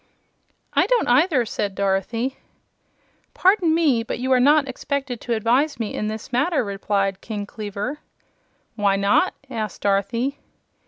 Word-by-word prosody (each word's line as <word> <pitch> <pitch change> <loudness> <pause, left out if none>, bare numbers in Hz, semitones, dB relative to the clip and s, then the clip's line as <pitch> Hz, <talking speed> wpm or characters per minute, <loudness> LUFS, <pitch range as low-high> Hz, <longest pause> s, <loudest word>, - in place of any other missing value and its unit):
"I - - +3
don't, - - +2
either," 260 0 +3
said 205 -2 -3
Dorothy. 200 +7 -1 1.0
"Pardon 365 -4 +3
me, 295 -8 +3
but 230 - -4
you 255 +2 -2
are 255 - +5
not 290 +2 +4
expected 270 -1 -4
to 240 - -2
advise 250 +7 +1
me 220 -3 -3
in 210 - -2
this 215 +1 -6
matter," 290 +4 +2
replied 195 -1 -1
King 210 -2 -5
Kleaver. 210 +7 -5 0.8
"Why 205 -3 +2
not?" 200 - +2
asked 220 -7 -5
Dorothy. 230 +7 0
235 Hz, 140 wpm, -22 LUFS, 205-280 Hz, 1.0 s, are